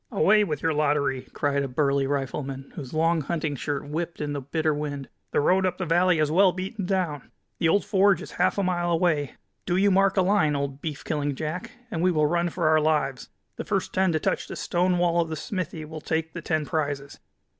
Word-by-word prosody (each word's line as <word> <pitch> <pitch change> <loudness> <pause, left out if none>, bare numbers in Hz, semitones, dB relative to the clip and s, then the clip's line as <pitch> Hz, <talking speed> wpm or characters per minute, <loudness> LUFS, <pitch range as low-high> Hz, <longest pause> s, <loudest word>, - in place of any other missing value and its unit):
"Away 210 0 +4
with 150 -7 -3
your 165 -1 +2
lottery!" 145 -3 +1
cried 140 -1 0
a 140 - -1
burly 140 +1 +1
rifleman, 135 -1 -3
whose 135 -5 -7
long 165 +1 +2
hunting 155 0 -2
shirt 145 +1 -3
whipped 165 +3 -4
in 145 -1 -2
the 140 - -3
bitter 155 +3 0
wind. 145 -3 -4 0.2
"The - - +1
road 185 +5 +3
up 180 -1 0
the 185 - -2
valley 175 +1 +3
is 155 -1 +1
well 185 +3 +5
beaten 190 +2 -5
down. 180 -7 -1 0.3
The 165 - +3
old 200 +5 +2
forge 195 -1 +4
is - - -9
half - - +1
a 200 - +1
mile 175 -2 0
away. 165 -4 +1 0.3
Do 175 -1 +1
you 200 +1 +4
mark 195 +1 +3
a 190 - +5
line, 180 -6 +2
old 140 0 -3
beef 155 -3 -5
killing 145 -2 -1
Jack, 180 - -4 0.2
and 165 - -2
we 185 - +4
will 155 -4 +2
run 175 +3 +1
for 170 -1 -1
our 155 0 +5
lives. 150 -4 0 0.3
The - - -3
first - - -2
ten 190 -1 +2
to 155 - +1
touch - - -1
the - - -6
stone 180 +1 +1
wall 175 -1 +2
of 165 - -3
the 160 - -3
smithy 160 -1 -4
will 155 0 -8
take 160 +1 -2
the 170 - -6
ten 155 -2 -1
prizes." 145 -2 -3
160 Hz, 225 wpm, -26 LUFS, 145-180 Hz, 0.3 s, well